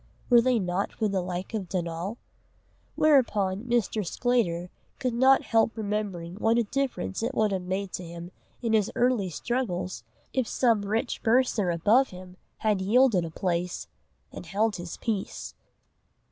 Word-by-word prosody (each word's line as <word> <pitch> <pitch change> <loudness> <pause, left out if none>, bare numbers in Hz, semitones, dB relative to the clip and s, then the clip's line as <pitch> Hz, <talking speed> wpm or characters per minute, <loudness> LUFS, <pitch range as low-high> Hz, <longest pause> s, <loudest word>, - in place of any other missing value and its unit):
Were 240 -1 +8
they 250 0 +2
not 185 -1 -1
for 220 - -1
the 195 -2 0
like 180 +3 -5
of 200 -5 -3
Donal? 175 +4 -3 0.8
Whereupon 220 -9 +3
Mr. 235 -3 0
Sclater 180 -4 0 0.3
could 255 -2 -1
not 260 +3 +5
help 225 0 +2
remembering 200 -5 -3
what 225 +2 +2
a 235 - +3
difference 240 - -2
it 250 +4 -2
would 215 -1 +2
have 190 -1 -1
made 190 +1 -3
to 180 - -4
him 170 +1 -8 0.3
in 230 -1 +1
his 215 -3 +2
early 240 -6 +2
struggles, 180 - -3 0.3
if 260 -3 0
some 230 -5 +2
rich 220 +5 -2
bursar 230 -5 +2
above 210 +11 +4
him 180 0 -11 0.2
had 210 -3 +1
yielded 215 -2 +4
a - - -5
place 175 +1 -2 0.5
and - - -9
held 210 +1 0
his 175 -1 -7
peace. 215 -4 -3
205 Hz, 155 wpm, -27 LUFS, 180-235 Hz, 0.8 s, Were